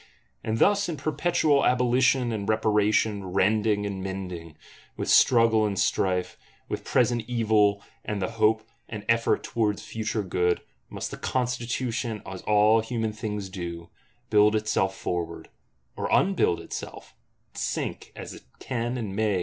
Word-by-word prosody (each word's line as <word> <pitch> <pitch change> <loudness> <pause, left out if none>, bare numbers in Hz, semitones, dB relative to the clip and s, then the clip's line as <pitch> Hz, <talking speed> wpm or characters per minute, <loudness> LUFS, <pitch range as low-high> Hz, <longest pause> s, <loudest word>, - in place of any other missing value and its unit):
And 110 0 -1
thus 200 - +3
in 160 - -3
perpetual 155 0 +1
abolition 125 0 +3
and 105 -2 -3
reparation, 105 -1 +2
rending 105 +3 +1
and 100 -2 -4
mending, 90 -4 -6 0.4
with - - -1
struggle 115 -3 +5
and 105 -2 -1
strife, 90 -1 0 0.3
with - - -4
present 120 -2 +1
evil 105 -4 +2 0.2
and 105 -1 -3
the 95 +3 -2
hope 110 0 +2 0.2
and 105 -2 -7
effort 115 0 +2
towards 105 -3 -1
future 110 -1 -3
good, 90 -1 0 0.3
must - - -5
the - - -6
Constitution, 120 -2 -2
as 95 0 -7
all 105 +1 +5
human 115 -1 -2
things 105 -2 -4
do, 85 -3 -7 0.4
build 105 +1 +5
itself 105 -3 0
forward; 85 -2 -4 0.5
or - - -3
unbuild 190 - +3
itself, - - -8 0.4
and - - -9
sink, - - -3
as - - -8
it - - -11 0.2
can 120 0 -3
and 105 -5 -4
may. 105 -3 +1
110 Hz, 140 wpm, -26 LUFS, 100-120 Hz, 0.5 s, struggle